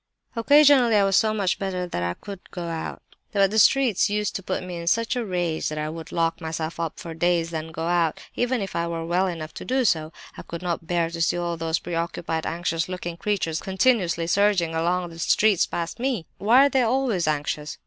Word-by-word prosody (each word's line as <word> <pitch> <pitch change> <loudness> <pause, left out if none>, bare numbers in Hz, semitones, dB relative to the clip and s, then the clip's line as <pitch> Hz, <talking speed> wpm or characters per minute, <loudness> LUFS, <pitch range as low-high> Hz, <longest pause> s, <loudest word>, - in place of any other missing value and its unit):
"Occasionally 275 -1 +5
I 205 - +5
was 195 -1 +2
so 215 +2 +4
much 200 -4 0
better 185 -2 -2
that 170 - -4
I 85 0 -2
could 200 -2 -9
go 175 - -6
out; 165 -1 -5 0.3
but 195 -2 +3
the 220 - +2
streets 240 -3 +4
used 210 0 -1
to - - -3
put 185 - -3
me 180 -1 -6
in 170 0 -7
such 230 +6 +1
a 245 - -1
rage 175 -5 -1
that 155 - -5
I 150 0 -2
would 165 0 -8
lock 165 0 0
myself 160 0 -4
up 165 -2 -3
for 165 - -7
days 170 0 +1
rather 160 -1 -3
than - - -11
go 160 +1 -4
out, 170 -2 +1 0.2
even 245 -1 0
if 195 - -5
I 170 0 0
were 165 -1 -4
well 180 +3 +1
enough 160 -3 -5
to - - -8
do 260 0 0
so! 160 -5 +1 0.2
I - - -8
could 170 +1 -8
not 170 -2 -3
bear 170 -2 0
to 170 0 -5
see 165 - +2
all 175 -1 -2
those 165 0 -1
preoccupied, 165 -1 -3
anxious 165 0 -2
looking 175 -2 -5
creatures 170 -3 -1
continuously 190 -4 +1
surging 185 -2 +2
along 175 +2 0
the 165 - -11
streets 205 +2 +3
past 170 +5 -4
me! 245 -9 -1
Why 240 +7 +6
are - - +3
they 265 -2 +2
always 235 - +1
anxious? 150 0 -2
175 Hz, 225 wpm, -24 LUFS, 165-210 Hz, 0.3 s, Why